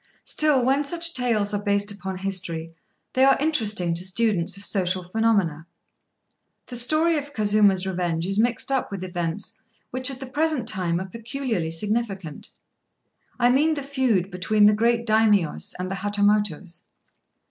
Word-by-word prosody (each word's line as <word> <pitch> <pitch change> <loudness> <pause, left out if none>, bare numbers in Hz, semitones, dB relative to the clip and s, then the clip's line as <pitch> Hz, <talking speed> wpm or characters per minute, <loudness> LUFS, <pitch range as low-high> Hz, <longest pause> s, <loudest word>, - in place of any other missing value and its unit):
Still, 295 -5 +2
when 270 +3 +2
such 335 +3 +1
tales 220 -5 0
are 205 - -1
based 205 0 0
upon 190 -1 -6
history, 175 -4 -3 0.4
they 260 - +3
are 270 0 +5
interesting 220 - 0
to 170 +2 -2
students 195 -2 0
of 200 - -4
social 185 -2 0
phenomena. 185 -5 0 1.0
The 250 - -8
story 310 +7 +2
of 290 0 -10
Kazuma's 205 -4 +3
revenge 175 -3 -2
is 195 +2 -1
mixed 240 +3 +1
up 265 -1 0
with 195 -2 -5
events 175 +1 -3 0.3
which 255 +2 0
at 265 -2 -6
the 265 - -6
present 290 -1 -1
time 175 -2 +1
are 190 - -4
peculiarly 230 -3 -4
significant: 195 -2 -3 0.9
I 245 0 +4
mean 305 +5 +2
the 285 - -4
feud 255 -9 0
between 205 +4 +2
the 210 - +6
great 235 +2 +1
Daimios 210 - +2
and 185 +1 -4
the - - -2
Hatamotos. 205 -4 0
210 Hz, 155 wpm, -24 LUFS, 185-250 Hz, 1.0 s, the